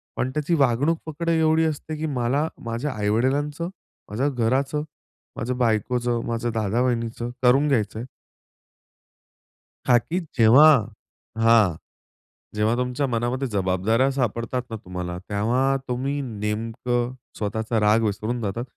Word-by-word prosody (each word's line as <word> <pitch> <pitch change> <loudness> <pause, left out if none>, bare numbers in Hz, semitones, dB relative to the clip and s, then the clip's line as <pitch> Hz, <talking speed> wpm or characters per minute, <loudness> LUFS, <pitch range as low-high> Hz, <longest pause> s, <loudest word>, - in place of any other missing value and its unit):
पण 130 0 -1
त्याची 150 +4 -1
वागणूक 140 +4 +2
फक्त 165 +2 -3
एवढी 160 0 +3
असते 155 0 -3
की 160 - -3
मला 140 +2 0 0.2
माझ्या 115 +6 -3
आईवडिलांचं, 135 +10 0 0.4
माझ्या 125 +8 0
घराचं, 135 +4 0 0.5
माझ्या 125 +2 -2
बायकोचं, 120 +1 0
माझ्या 115 0 -2
दादा-वहिनीचं 115 +2 -1
करून 135 +4 +5
घ्यायचंय. 110 -3 0 1.8
का 125 - +6
की 165 +9 -2 0.2
जेव्हा 120 +7 +8 0.7
हां, 115 -6 +5 0.8
जेव्हा 110 +2 +2
तुमच्या 125 +3 -1
मनामध्ये 125 +2 -1
जबाबदाऱ्या 100 +5 +1
सापडतात 125 -1 -1
ना 115 - -5
तुम्हाला, 90 -3 -6
तेव्हा 125 +7 +1
तुम्ही 135 +3 -2
नेमकं 115 +2 -2 0.2
स्वतःचा 110 +2 -1
राग 105 +2 +4
विसरून 110 +3 -2
जातात. 110 +3 -3
120 Hz, 115 wpm, -24 LUFS, 110-135 Hz, 1.8 s, जेव्हा